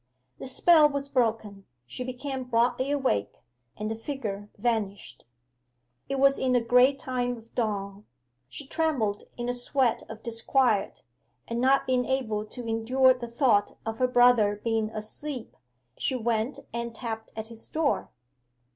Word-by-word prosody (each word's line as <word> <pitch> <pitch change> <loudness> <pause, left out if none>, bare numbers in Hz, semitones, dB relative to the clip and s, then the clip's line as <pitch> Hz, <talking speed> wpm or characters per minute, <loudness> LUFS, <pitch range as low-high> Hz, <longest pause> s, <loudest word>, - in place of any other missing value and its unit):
The - - -5
spell 305 +3 +5
was 280 -1 -4
broken: 220 -6 -1 0.2
she 130 - -5
became 260 +1 -5
broadly 250 +2 +1
awake; 265 - 0 0.4
and 215 +1 -3
the - - 0
figure 220 -4 -5
vanished. 200 - -2 0.8
It 275 - -1
was 275 +1 +4
in 255 -1 +1
the 245 - +5
grey 250 +4 +4
time 245 -2 -2
of 230 0 -17
dawn. 205 -3 -3 0.4
She 290 - -7
trembled 265 -10 -1
in 240 0 -3
a 245 - 0
sweat 245 0 +1
of 220 0 -9
disquiet, 230 -2 +1 0.4
and 230 +1 -2
not 270 +1 +4
being 250 -1 +1
able 220 -6 -1
to 240 +1 -8
endure 250 +4 +4
the 250 -1 -7
thought 235 -4 +2
of 225 0 -4
her 255 - +3
brother 245 -5 +4
being 225 -2 0
asleep, 225 +4 -6 0.4
she 260 - 0
went 230 +1 -1 0.2
and 235 0 -4
tapped 225 -2 -5
at 220 0 -6
his 230 -1 -10
door. 315 -2 0
240 Hz, 150 wpm, -27 LUFS, 220-260 Hz, 0.8 s, spell